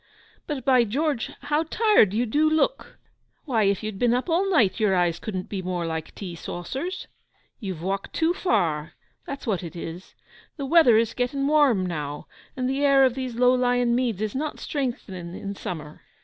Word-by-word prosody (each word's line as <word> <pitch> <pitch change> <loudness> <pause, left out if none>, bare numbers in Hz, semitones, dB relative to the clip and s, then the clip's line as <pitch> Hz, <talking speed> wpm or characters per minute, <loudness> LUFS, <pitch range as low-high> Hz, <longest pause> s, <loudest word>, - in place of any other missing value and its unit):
But, 275 -5 -4
by 255 -3 +5
George, 275 +3 -1
how 295 +2 +1
tired 370 - +4
you 230 +4 +1
dew 300 +7 +2
look! 315 +11 0 0.5
Why, 230 -8 +2
if 200 0 +1
you'd 215 -2 -5
been 240 -1 +3
up 255 +8 -2
all 375 +4 +2
night 235 - +3
your 210 -3 +3
eyes 175 -2 +1
couldn't 190 -4 -4
be 195 -2 -4
more 180 -2 -2
like 160 -1 -5
tea 185 -4 -6
saucers. 260 - -5 0.5
You've 185 -7 -5
walked 195 +1 -3
tew 330 +1 +2
far, 160 - 0 0.3
that's 275 0 -6
what 210 -7 0
it 170 -1 -8
is. 170 +2 -8 0.4
The 280 - -3
weather 270 -6 +6
is 230 0 +1
getting 260 +2 -1
warm 280 -10 +4
now, 150 -4 -4 0.3
and 255 -1 -1
the 270 +2 -1
air 275 -1 +6
of 255 - +2
these 255 -2 -4
low 250 +1 +4
lying 245 -1 +2
meads 235 -5 0
is 215 - -2
not 300 +3 -3
strengthening 190 - -4
in 200 0 -5
summer. 155 -6 -7
235 Hz, 185 wpm, -25 LUFS, 185-275 Hz, 0.5 s, weather